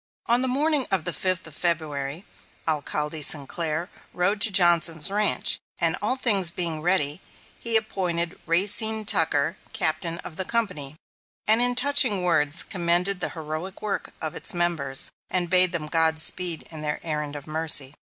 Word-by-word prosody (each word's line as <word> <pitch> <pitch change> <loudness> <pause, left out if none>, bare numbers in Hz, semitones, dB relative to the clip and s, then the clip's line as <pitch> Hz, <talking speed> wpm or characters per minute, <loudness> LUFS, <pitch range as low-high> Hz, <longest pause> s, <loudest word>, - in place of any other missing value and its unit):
On 240 +2 +3
the 260 - 0
morning 285 +1 +1
of 190 -4 0
the 175 - -3
fifth 185 -1 -1
of 160 - -11
February, 155 -2 -2 0.4
Alcalde 150 0 -2
Sinclair 155 +3 +1 0.3
rode 200 +4 0
to 220 - +7
Johnson's 170 -2 +3
ranch, 210 +1 +3 0.2
and - - +1
all 255 - 0
things 205 -9 +2
being 170 -2 -1
ready, 170 -2 +1 0.4
he 230 -1 +1
appointed 175 -6 -3
Racine 210 +5 +1
Tucker 160 -1 +2 0.2
Captain 165 +1 0
of 160 - -10
the 190 - -1
company, 180 -11 -1 0.5
and 220 +2 +4
in 245 0 +1
touching 250 -7 +4
words 160 -2 +3
commended 180 +1 0
the - - -2
heroic 160 +6 -6
work 210 -2 -4
of 155 -2 -5
its 215 - -2
members, 160 -6 0 0.2
and 175 -2 0
bade 185 -1 +5
them 170 -4 -4
godspeed 160 +1 0
on 155 -2 -7
their 150 0 -3
errand 150 -2 -4
of 145 -1 -8
mercy. 155 -3 +1
170 Hz, 155 wpm, -24 LUFS, 155-195 Hz, 0.5 s, to